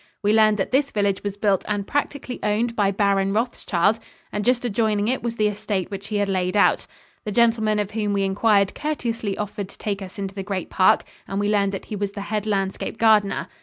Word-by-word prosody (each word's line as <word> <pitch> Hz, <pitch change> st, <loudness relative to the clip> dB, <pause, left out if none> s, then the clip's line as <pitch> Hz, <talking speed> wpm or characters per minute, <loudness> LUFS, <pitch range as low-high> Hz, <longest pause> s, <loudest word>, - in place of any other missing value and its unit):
We 205 Hz, +1 st, +3 dB
learned 215 Hz, -1 st, +5 dB
that 195 Hz, -, -2 dB
this 280 Hz, +2 st, +2 dB
village 200 Hz, -2 st, 0 dB
was 205 Hz, -1 st, -4 dB
built 205 Hz, -2 st, +1 dB
and 205 Hz, -2 st, -1 dB
practically 285 Hz, -2 st, -3 dB
owned 225 Hz, +3 st, 0 dB
by 205 Hz, -3 st, +2 dB
Baron 195 Hz, -1 st, +1 dB
Rothschild, 215 Hz, -3 st, +1 dB, 0.3 s
and 210 Hz, -, -2 dB
just 245 Hz, +2 st, +1 dB
adjoining 215 Hz, -2 st, +1 dB
it 255 Hz, +2 st, 0 dB
was 235 Hz, -1 st, -3 dB
the 215 Hz, -, +1 dB
estate 210 Hz, -2 st, -3 dB
which 200 Hz, 0 st, -6 dB
he 215 Hz, -, -4 dB
had 205 Hz, -1 st, +1 dB
laid 185 Hz, 0 st, 0 dB
out. 200 Hz, -, +3 dB, 0.4 s
The 210 Hz, -, -4 dB
gentleman 220 Hz, -1 st, +3 dB
of 210 Hz, -1 st, -2 dB
whom 210 Hz, -2 st, -1 dB
we 200 Hz, -1 st, +1 dB
inquired 200 Hz, 0 st, +2 dB
courteously 230 Hz, -9 st, -3 dB
offered 205 Hz, -2 st, -4 dB
to -, -, -15 dB
take 200 Hz, -2 st, -3 dB
us 190 Hz, +1 st, -9 dB
into 195 Hz, -1 st, -4 dB
the 195 Hz, -, -5 dB
great 190 Hz, -2 st, -4 dB
park, 185 Hz, -, +4 dB, 0.2 s
and 195 Hz, -, -2 dB
we 205 Hz, 0 st, +1 dB
learned 200 Hz, -2 st, +2 dB
that 195 Hz, -, -5 dB
he 215 Hz, -, -5 dB
was 200 Hz, 0 st, -3 dB
the 200 Hz, -, -5 dB
head 210 Hz, +1 st, -3 dB
landscape 195 Hz, +1 st, -2 dB
gardener. 215 Hz, -3 st, +3 dB
205 Hz, 220 wpm, -23 LUFS, 195-220 Hz, 0.4 s, learned